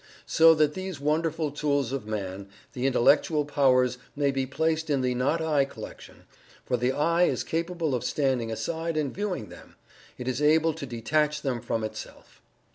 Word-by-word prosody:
So 165 0 +6
that 155 -1 +2
these 185 -3 -5
wonderful 155 +1 0
tools 145 -3 0
of 135 -6 -4
Man 100 -2 -5 0.2
the 130 -1 -1
Intellectual 145 +4 +3
powers 130 -4 +2 0.2
may 140 -1 +1
be 135 -1 -2
placed 160 +3 -1
in 140 -3 +1
the 125 -1 +1
"not 130 +7 0
I" 155 -3 +2
collection, 135 - -10 0.4
for 125 - 0
the 125 +1 +1
"I" 170 +5 +2
is - - -1
capable 165 -2 -2
of 125 - -1
standing 130 -5 0
aside 160 +8 -3
and 145 -3 -1
viewing 185 - -3
them 90 - -14 0.4
it 125 - -7
is 130 +2 -1
able 160 +2 +4
to 145 -3 -7
detach 150 +6 0
them 130 -4 -1
from 110 0 -2
itself. 110 0 -8
145 Hz, 175 wpm, -27 LUFS, 125-160 Hz, 0.4 s, So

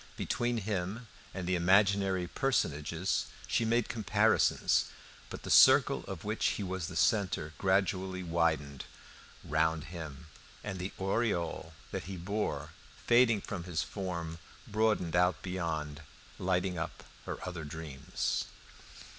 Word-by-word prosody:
Between 120 0 0
him 100 +2 -3 0.3
and 95 -2 -5
the 90 - 0
imaginary 95 +1 +3
personages 85 - 0 0.2
she 115 - +1
made 115 0 +2
comparisons. 110 -6 +3 0.4
But - - -8
the - - -4
circle - - +7
of 95 -4 -6
which 110 +2 -2
he 105 - -3
was 95 -2 -3
the 90 - -7
centre 95 -7 +1
gradually 95 -1 +1
widened 80 -5 0 0.6
round 80 0 +1
him, 80 -3 -7 0.4
and 95 - -4
the 90 +2 -3
aureole 95 -5 -1 0.2
that - - -4
he 95 0 -6
bore, 100 +5 -2 0.3
fading 120 -3 +5
from 90 -4 -5
his 85 -3 -1
form, 85 -4 -5 0.3
broadened 105 -6 +1
out 90 -1 +2
beyond, 80 -5 -3 0.4
lighting 90 -1 0
up 85 - -5 0.2
her - - -3
other 90 -3 -5
dreams. 75 -2 -3
90 Hz, 125 wpm, -32 LUFS, 80-100 Hz, 0.6 s, circle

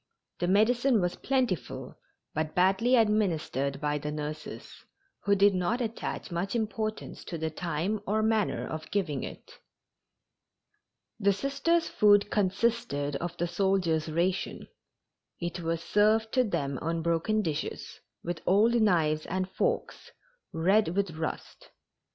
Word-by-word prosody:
The 175 - 0
medicine 235 +5 +3
was 180 -1 0
plentiful, 255 - -2 0.4
but 155 0 -2
badly 195 +7 +4
administered 170 - +1
by 150 0 -1
the 150 +1 -4
nurses, 150 0 -7 0.4
who 200 0 +4
did 200 +1 +5
not 185 +7 0
attach 230 -5 -4
much 180 +6 -2
importance 215 -1 -3
to 170 - -5
the 160 0 -2
time 175 +6 -2
or 215 +2 +1
manner 220 -2 +1
of 155 0 -6
giving 170 -9 -1
it. - - -10 1.6
The 200 - +4
Sisters' 280 - 0
food 205 -1 +4
consisted 200 - 0
of 175 +2 -5
the 175 - 0
soldiers' 175 -3 +1
ration. 175 +4 -1 0.7
It 175 +1 -4
was 165 -1 -2
served 220 +2 +3
to 255 - +3
them 140 - -2
on 165 0 -2
broken 170 +6 +1
dishes, 160 -3 -4 0.2
with 170 -1 -4
old 210 +5 +4
knives 160 -7 +2
and 185 +1 -1
forks, 480 0 -2 0.4
red 185 +2 +2
with 200 -3 0
rust. 160 0 -6
190 Hz, 130 wpm, -29 LUFS, 165-215 Hz, 1.6 s, did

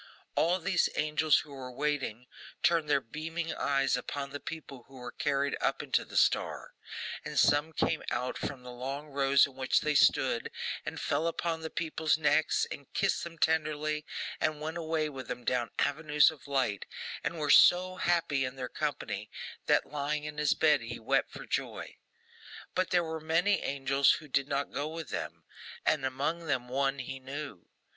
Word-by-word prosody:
All 175 +3 +3
these 185 +1 +2
angels, 155 0 +3
who 150 - -14
were 130 -2 -7
waiting, 135 -4 -2 0.4
turned 165 -3 +3
their 140 -1 +4
beaming 160 +6 -4
eyes 135 -1 +1
upon 140 +3 -4
the 145 - -5
people 140 -7 -8
who 135 - -16
were 125 -1 -7
carried 140 -1 0
up - - 0
into - - +1
the - - -6
star; - - +1 0.5
and - - -6
some 145 +2 +4
came 160 0 0
out 125 +1 -2
from 130 -3 -5
the 125 - -8
long 135 +4 -5
rows 140 -1 +4
in 140 - -10
which 130 0 +1
they 150 - +1
stood, 130 -4 +3 0.4
and - - -4
fell 165 - 0
upon 165 -1 -2
the 160 - -4
people's 160 -2 0
necks, 155 0 +2
and 140 - -8
kissed - - +1
them 170 -1 -7
tenderly, 155 -1 +1 0.4
and 155 -1 0
went 160 +2 -4
away 160 -2 0
with 135 -4 -7
them 125 0 -5
down 120 -2 +1
avenues 150 +1 +4
of 155 -2 -14
light, 130 -8 0 0.4
and 170 - -2
were 150 -2 +1
so 185 +1 +6
happy 165 -7 +1
in 130 0 -3
their 130 -1 -4
company, 105 -9 -3 0.4
that - - +4
lying 150 +1 -2
in 150 0 -5
his 150 -1 +3
bed 150 -4 +4
he 115 +1 -6
wept 110 - +1
for - - -8
joy. - - -3 0.8
But, 185 0 0
there 175 -1 +3
were 160 -1 -4
many 165 +6 +2
angels 135 0 +3
who 155 - -6
did 140 0 +1
not 140 0 -1
go 145 +2 -1
with 160 0 -6
them, - - -5 0.4
and 150 -3 +2
among 145 +6 -2
them 125 -4 -1
one 135 +1 +1
he 135 0 -5
knew. 135 - -7
145 Hz, 180 wpm, -31 LUFS, 135-160 Hz, 0.8 s, so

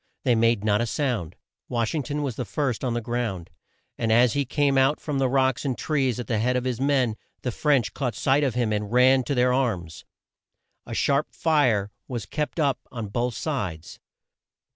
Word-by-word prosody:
They 125 - +3
made 115 -2 +2
not 105 0 +2
a 120 - 0
sound. 110 - -2 0.3
Wash 115 -2 -1
ing 155 - 0
ton 145 +2 -3
was 130 -5 -3
the 125 - -3
first 135 -1 -2
on 125 -2 -1
the 120 - -1
ground, 115 -7 -3 0.5
and 115 -1 0
as 120 0 +5
he 140 -1 0
came 140 +1 +1
out 135 +3 +3
from 145 -3 -3
the 130 -1 +2
rocks 130 -1 +1
and 135 -4 -2
trees 135 -6 0
at 120 - -4
the 110 0 -1
head 125 +3 +1
of 125 - 0
his 130 -1 -2
men, 130 -6 +1 0.3
the 125 - -1
French 140 -2 +1
caught 125 -6 -2
sight 140 +5 +2
of 130 -5 0
him 120 -3 +1
and 105 0 -2
ran 130 +2 +5
to 140 - -1
their 125 0 +3
arms. 95 - -2 0.8
A - - -5
sharp 140 +1 +2
fire 125 -11 +2 0.2
was 120 -6 -4
kept 150 - -3
up 140 -5 +1
on 115 -4 -5
both 120 +2 -1
sides. 90 - -4
125 Hz, 205 wpm, -25 LUFS, 110-135 Hz, 0.8 s, as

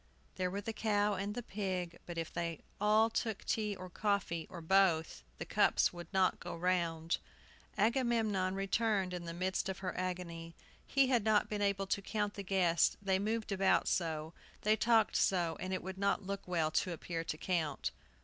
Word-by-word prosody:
There 185 -1 -1
were 200 +2 -3
the 225 +2 -4
cow 210 -1 +1
and 200 +2 -3
the 245 - -4
pig. 185 -5 -3
But 175 -1 -6
if 165 0 -4
they 170 -2 -3 0.2
all 215 +2 +5
took 220 -3 -2
tea 210 -2 0
or 185 -1 -8
coffee, 190 -4 -1
or 175 - -8
both, 165 - +2 0.2
the - - -5
cups - - +3
could 175 0 -9
not 190 -2 +2
go - - -6
round. 170 -2 0 0.6
Agamemnon 220 -4 +2
returned 195 -1 +1
in 175 -1 -5
the 170 - -5
midst 185 +2 -1
of 190 - -3
her - - -2
agony. 170 -2 -4 0.3
He 275 -1 +3
had 240 -5 +3
not 215 -1 +3
been 210 -1 -2
able 200 -1 +1
to 195 +1 -1
count 210 0 -2
the 200 - -5
guests, 180 -4 +2
they 190 -1 +1
moved 215 +2 -1
about 195 -1 +3
so, 160 -2 -1 0.3
they 215 +1 +4
talked 225 0 +3
so; 175 -4 +2
and 185 - -4
it 185 - -2
would 190 +1 -6
not 200 0 +1
look 200 0 -4
well 165 -3 +1
to 180 +1 +1
appear 165 0 -4
to 155 - -4
count. 165 -3 -1
190 Hz, 190 wpm, -34 LUFS, 175-210 Hz, 0.6 s, all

